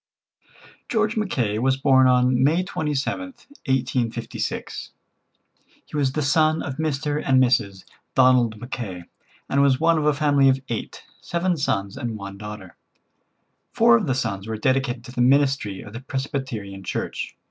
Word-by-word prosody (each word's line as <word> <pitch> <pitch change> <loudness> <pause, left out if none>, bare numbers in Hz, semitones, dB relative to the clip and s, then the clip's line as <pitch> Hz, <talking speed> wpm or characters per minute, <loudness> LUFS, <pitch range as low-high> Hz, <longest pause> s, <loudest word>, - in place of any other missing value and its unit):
George 215 -1 +1
Mackay 125 - -1
was 130 +2 +2
born 135 -1 +5
on 125 0 +3
May 160 +6 +3
27th, 155 - -3 0.2
1856. 125 -3 -2 0.9
He - - -11
was 135 -3 +1
the 150 - -1
son 155 +2 +2
of 135 -2 -5
Mr. 150 -1 -1
and 130 -1 +4
Mrs. 105 -7 +1 0.3
Donald 125 -4 +4
Mackay, 110 -7 -6 0.4
and 140 - +2
was 135 -2 +3
one 165 0 +3
of 150 - -1
a 150 - +4
family 145 -2 +4
of 135 0 +2
eight, 115 - -5 0.2
seven 175 +1 -1
sons 100 -10 -2
and 115 -2 -4
one 100 -1 -8
daughter. 105 -3 -9 1.0
Four 235 +1 +6
of 220 -7 +1
the 130 - +1
sons 110 -6 -3
were 110 -1 -3
dedicated 130 0 0
to 120 - -10
the 125 - -2
ministry 135 -6 +2
of 105 - -11
the 120 - -7
Presbyterian 130 -8 -4
Church. - - -4
130 Hz, 150 wpm, -23 LUFS, 115-145 Hz, 1.0 s, Four